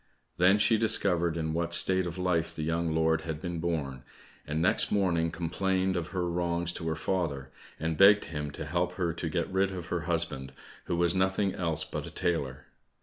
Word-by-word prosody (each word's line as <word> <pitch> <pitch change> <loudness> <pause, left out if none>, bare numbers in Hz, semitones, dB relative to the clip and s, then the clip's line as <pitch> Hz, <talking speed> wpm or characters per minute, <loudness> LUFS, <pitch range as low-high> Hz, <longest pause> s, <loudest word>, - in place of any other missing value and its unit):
Then 90 +3 +5
she 110 +1 +3
discovered 85 -6 +2
in 80 -1 -2
what 85 +1 +2
state 95 -1 +5
of 85 +1 -6
life 90 -2 -1
the 80 - -4
young 80 +1 -1
lord 80 0 +2
had 80 -1 -5
been 85 -1 -4
born, 75 -6 -3 0.5
and 75 +2 -2
next 85 - +2
morning 85 -5 +1
complained 95 +3 -1
of 85 -1 -2
her 90 -1 -2
wrongs 85 0 -1
to 80 - -5
her 80 - -1
father, 80 -6 -2 0.3
and 80 0 -2
begged 100 +1 +7
him 75 -2 -5
to - - -6
help 85 +3 -1
her 90 -3 -2
to 85 0 -4
get 85 +1 -1
rid 95 +1 +1
of 90 -2 -7
her 90 - -1
husband, 75 -6 -1 0.3
who - - -2
was 85 0 +2
nothing 95 +1 +1
else 85 -4 -2
but - - -6
a - - -6
tailor. 70 -7 -2
85 Hz, 200 wpm, -29 LUFS, 80-90 Hz, 0.5 s, begged